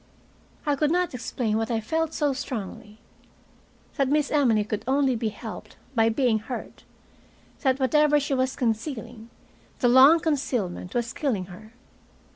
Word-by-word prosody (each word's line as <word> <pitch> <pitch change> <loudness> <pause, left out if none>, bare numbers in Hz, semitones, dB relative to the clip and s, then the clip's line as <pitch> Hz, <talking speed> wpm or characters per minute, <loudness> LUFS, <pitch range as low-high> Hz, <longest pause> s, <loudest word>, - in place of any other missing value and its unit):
I 290 -1 +2
could 295 +1 +1
not 355 0 0
explain 230 -2 -2
what 225 0 -2
I 230 -2 0
felt 320 +8 -1
so 295 -3 0
strongly 215 -5 -6 1.0
that 275 -2 +2
Miss 295 0 +1
Emily 245 -8 +3
could 215 0 -4
only 270 -1 +2
be 220 -1 -1
helped 220 +1 -9 0.2
by 225 -2 +3
being 230 -1 +1
hurt, 225 +3 -8 0.7
that 265 -2 +1
whatever 295 +3 +3
she 285 0 -2
was 260 0 0
concealing, 230 -1 -3 0.5
the 245 - +2
long 270 +6 +7
concealment 250 - -2
was 240 +1 -1
killing 230 -11 -1
her. 215 +5 -14
250 Hz, 145 wpm, -25 LUFS, 220-285 Hz, 1.0 s, long